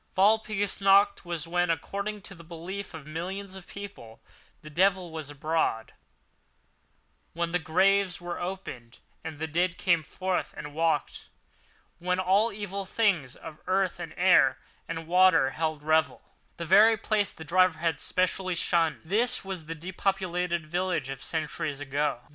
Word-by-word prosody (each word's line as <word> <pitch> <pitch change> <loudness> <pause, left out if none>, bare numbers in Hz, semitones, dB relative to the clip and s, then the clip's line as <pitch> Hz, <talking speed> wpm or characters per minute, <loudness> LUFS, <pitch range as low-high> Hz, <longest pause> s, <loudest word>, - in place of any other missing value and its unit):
Walpurgis 205 0 +2
Night, 200 +1 +5
when, 175 +1 -1
according 200 +5 -3
to 195 - -9
the 170 -3 -13
belief 175 +3 -7
of 155 -3 -9
millions 185 +5 -5
of 190 -1 -11
people, 200 - -10 0.4
the 155 - -9
devil 185 +1 +2
was 160 -3 -6
abroad—when 145 -6 -1 1.6
the 180 - +1
graves 185 +3 +2
were 175 0 -5
opened 155 -11 -6 0.3
and 160 -2 -6
the 160 - -3
dead 170 +3 0
came 170 -4 +2
forth 185 +5 -3
and 150 -1 -7
walked. 160 -2 -1 0.7
When 180 +1 0
all 195 +5 +3
evil 200 -1 -5
things 185 - 0
of 155 - -10
earth 190 0 +1
and - - -7
air - - +5 0.3
and 165 0 -5
water 175 -5 +5
held 155 -1 -2
revel. 160 +1 +1 0.3
This 170 - -5
very 215 +5 +7
place 205 -1 +1
the 160 - -10
driver 185 +1 +3
had 165 -1 -1
specially 185 0 0
shunned. 165 -2 +1
This 215 +6 +1
was 185 -5 -5
the 165 - -4
depopulated 180 -1 -2
village 175 -3 -1
of 135 -1 -6
centuries 155 -2 -3
ago. 145 -2 -1
175 Hz, 145 wpm, -28 LUFS, 160-195 Hz, 1.6 s, very